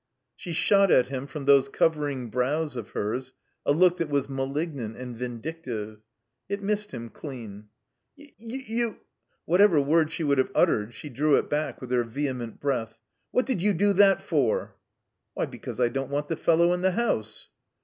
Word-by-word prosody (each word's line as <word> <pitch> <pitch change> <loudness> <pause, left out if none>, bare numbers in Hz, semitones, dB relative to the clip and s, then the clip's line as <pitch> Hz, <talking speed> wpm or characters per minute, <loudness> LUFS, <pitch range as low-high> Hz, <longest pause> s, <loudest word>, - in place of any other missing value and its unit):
She 175 - -7
shot 195 +4 +4
at 125 -5 +4
him 135 0 -4
from 145 0 -7
those 140 -1 +5
covering 145 -7 0
brows 145 +5 0
of 115 -4 -6
hers 125 +5 -3 0.3
a - - +5
look 180 +4 +4
that 165 -3 -2
was 140 -2 0
malignant 135 -3 -3
and 125 -1 -7
vindictive. 120 -3 -5 0.5
It 200 0 -3
missed 210 +1 -1
him 115 0 -7
clean. 110 -7 -9 0.5
"Y 290 -1 -16
— - - -39
y 240 +4 -6
— - - -18
^you 230 0 -1 0.2
!" - - -46
Whatever 180 -1 +5
word 155 +3 +3
she 165 - -3
would 140 -2 +2
have 130 - +2
uttered 105 +2 +2
she 150 - -8
drew 145 +3 +2
it - - 0
back 150 +1 -1
with 125 -1 -7
her 125 -1 +3
vehement 120 -1 -4
breath. 115 -6 -2 0.3
*'What 250 - +1
did 255 -10 -1
you 205 +2 +3
do 200 +3 +3
that 195 0 +5
for?" 145 - 0 0.6
"Why, - - 0
because - - -8
I 125 - +4
don't 135 +2 -3
want 145 +1 -2
the 165 - 0
fellow 170 +2 +3
in 180 - -2
the 190 0 +2
house." 110 - -1
145 Hz, 190 wpm, -26 LUFS, 125-175 Hz, 0.6 s, those